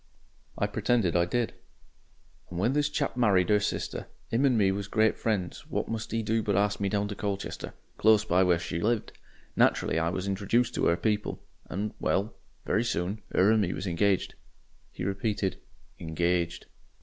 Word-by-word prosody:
I - - +1
pretended 105 -3 +1
I 85 0 +4
did. 120 +5 -1 1.0
"And 85 - -6
when 115 +8 +2
this 145 0 +2
chap 150 - -1
married 105 -6 +3
'er 105 - +5
sister 100 - -3 0.2
'im 120 +5 +2
and 130 -4 +3
me 100 -3 +4
was 100 0 -3
great 110 +1 +2
friends 100 -6 -2
what - - -2
must 115 -1 -4
'e 115 0 -1
do 110 +1 +1
but 105 -2 0
arst 100 +1 +1
me 100 -1 0
down 100 +1 0
to - - -3
Colchester, 100 -1 -4 0.2
close 110 -1 +5
by 90 -3 +3
where 90 -2 +4
She 85 0 -4
lived. 115 0 0 0.4
Naturally 80 - +3
I 80 +1 +1
was 95 +2 -3
introjuced 100 +5 +1
to - - +1
'er 85 - +3
people, 105 0 -1 0.3
and 105 +4 -3
well, 100 +4 0 0.3
very 110 +4 +1
soon, 100 -2 -2
her 95 +3 +5
and 110 -1 +4
me 90 -3 0
was - - -5
engaged." 95 +2 +1 0.6
He - - -7
repeated 100 0 -1 0.4
"engaged." 85 +1 -1
100 Hz, 180 wpm, -28 LUFS, 90-110 Hz, 1.0 s, er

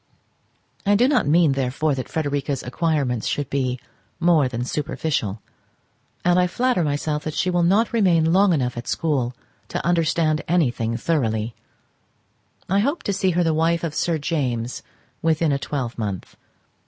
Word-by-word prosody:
I 205 +1 +3
do 240 +5 +4
not 255 - +2
mean, 160 0 +4
therefore, 135 +3 0
that 130 -2 -4
Frederica's 145 -3 -2
acquirements 130 -4 -1
should 145 -2 -2
be 130 -2 -1 0.4
more 165 -5 +4
than 120 -1 -3
superficial, 130 -7 -2 0.8
and 175 0 +4
I 180 - +3
flatter 245 -1 +1
myself 150 +1 -1
that 155 -1 -4
she 185 - +1
will 175 0 +2
not 200 +8 +3
remain 170 -7 +3
long 195 +1 +5
enough 125 -7 0
at 120 - -6
school 130 -6 -1 0.3
to - - -4
understand 165 -2 +2
anything 120 -9 +1
thoroughly. 115 -6 -1 1.1
I 195 +2 +2
hope 280 +10 0
to 200 - -1
see 190 0 +1
her 175 - +4
the 165 -1 +2
wife 165 +1 +1
of 165 -3 -2
Sir 170 0 0
James 130 -6 -2 0.4
within 160 -1 +2
a 140 - 0
twelvemonth. 115 - -4
155 Hz, 155 wpm, -22 LUFS, 130-175 Hz, 1.1 s, long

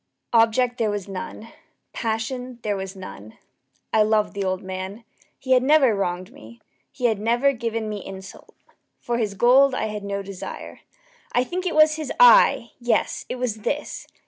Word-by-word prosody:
Object 235 +2 +3
there 220 -2 +1
was 205 -2 -3
none. 200 +3 -7 0.4
Passion 245 +3 -3
there 210 -1 -1
was 190 0 -6
none. 110 - -10 0.6
I 220 - +5
loved 215 0 +2
the 200 -1 -3
old 185 -1 -2
man. 190 +4 -6 0.3
He 260 - -6
had 255 -1 +6
never 270 -3 +4
wronged 185 +1 -3
me. 240 -4 -14 0.3
He 250 - -4
had 220 -4 +2
never 240 +6 +2
given 230 -2 -3
me 210 -2 -5
insult. 190 0 -11 0.4
For 240 0 -2
his 210 -3 -2
gold 255 +5 +5
I 220 - -2
had 210 -1 -5
no 200 0 -3
desire. 195 -1 -8 0.5
I 245 - +3
think 365 +7 -4
it 345 - -2
was 310 0 +5
his 310 -4 -4
eye! - - +6
yes, 240 -1 0
it - - -3
was 250 -4 -2
this! 285 +7 -4
225 Hz, 170 wpm, -23 LUFS, 200-255 Hz, 0.6 s, had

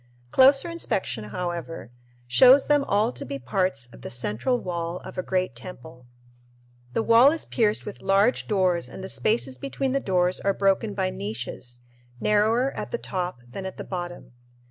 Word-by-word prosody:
Closer 275 +5 +6
inspection, 190 - -3
however, 170 -2 -5 0.3
shows 255 - +6
them 290 -1 +3
all 205 - +2
to 125 - -7
be 140 +2 -5
parts 135 +1 -1
of - - -14
the - - -7
central 120 - -1
wall 170 -2 -3
of - - -10
a 185 - -1
great 185 -7 -1
temple. 130 -2 -11 0.9
The 225 - 0
wall 230 +5 +7
is 325 - -3
pierced 215 -3 0
with 210 - -8
large 195 +5 +2
doors 185 -4 +1
and 190 - -9
the 190 - -6
spaces 135 - 0
between 195 - -2
the 275 - +1
doors 180 -5 +1
are 195 -1 0
broken 195 +2 +1
by 185 -1 0
niches, 120 - -6 0.4
narrower 220 - +2
at - - -6
the 475 - -2
top 180 - -4
than 160 +11 -7
at 190 - -8
the - - -5
bottom. 175 -5 -6
185 Hz, 170 wpm, -25 LUFS, 140-220 Hz, 0.9 s, wall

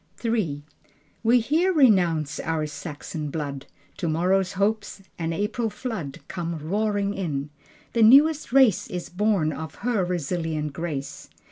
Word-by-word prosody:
III 180 -11 0 0.6
We 235 +2 +4
here 325 +10 +2
renounce 180 - +3
our 160 -1 -1
Saxon 150 0 -6
blood. 140 -2 -5 0.3
Tomorrow's 180 +3 +1
hopes, 205 0 -1 0.2
an 165 0 -1
April 210 +6 -1
flood 210 - -5
Come 170 -2 -4
roaring 200 +5 -1
in. 150 -7 -3 0.4
The 230 - +2
newest 285 +7 +6
race 260 -7 +4
Is 180 -1 -5
born 185 -5 +1
of 160 -2 -7
her 235 -6 +2
resilient 160 -3 -2
grace. 145 -3 -5
180 Hz, 125 wpm, -25 LUFS, 155-220 Hz, 0.6 s, newest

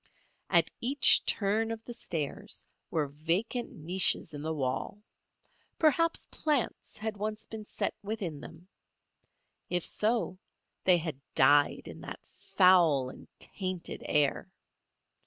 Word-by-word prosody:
At - - +5
each 265 +3 +5
turn 215 +2 +1
of 225 0 -5
the 240 - -6
stairs 155 -10 -4 0.2
were 155 -3 0
vacant 170 - -2
niches 175 0 +3
in 145 - -6
the 160 +1 -3
wall. 145 +8 -3 0.7
Perhaps 330 +2 +2
plants 295 -6 -1
had 215 -1 -4
once 215 +1 -4
been 220 -1 -8
set - - -2
within 195 -8 -4
them. 165 +4 -12 1.0
If 175 -2 0
so 215 -4 0 0.5
they 180 -2 +6
had 160 -5 -5
died 145 +2 +4
in - - -9
that - - -8
foul 165 -9 +4
and - - -14
tainted 185 -3 -4
air. 150 +5 +1
185 Hz, 120 wpm, -30 LUFS, 155-220 Hz, 1.0 s, they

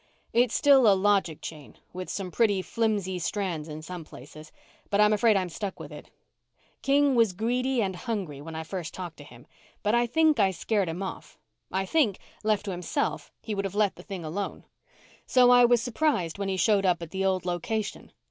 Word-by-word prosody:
"It's 240 0 +3
still 275 -5 +6
a 195 - +4
logic 195 -5 +1
chain, 150 -3 -9 0.2
with 185 0 -6
some 190 -3 -4
pretty 205 -4 +2
flimsy 200 -2 -1
strands 175 -4 -2
in 155 +1 -7
some 180 0 -7
places, 155 +2 -13 0.4
but 200 - +1
I'm 210 0 +5
afraid 215 0 +4
I'm 185 -1 -1
stuck 195 +3 -5
with - - -9
it. - - -11 0.7
King 280 0 +3
was 230 -6 +3
greedy 245 +4 0
and 190 -2 -2
hungry 180 - -4
when 160 +2 -8
I 160 - -4
first 170 -1 -6
talked 175 -3 -7
to 145 - -11
him, 120 -4 -15 0.4
but 210 0 +1
I 240 0 +3
think 315 +4 +3
I 195 - +5
scared 190 +1 -1
him 175 +4 -4
off. 190 - -7 0.3
I 190 +1 -1
think, 230 - +2 0.3
left 210 -1 +1
to 200 - -3
himself, 180 - -2
he 220 - -4
would 200 -1 -2
have 195 0 -4
let 210 -2 +2
the - - -12
thing 190 -5 -7
alone. 190 +6 -4 0.6
"So 250 -1 +5
I 245 0 +7
was 240 -1 +3
surprised 230 - 0
when 200 -1 -2
he 190 - -1
showed 200 +2 +3
up 175 -2 +1
at 165 - -9
the 190 0 -2
old 190 -2 0
location. 200 +5 -3
195 Hz, 205 wpm, -27 LUFS, 175-230 Hz, 0.7 s, I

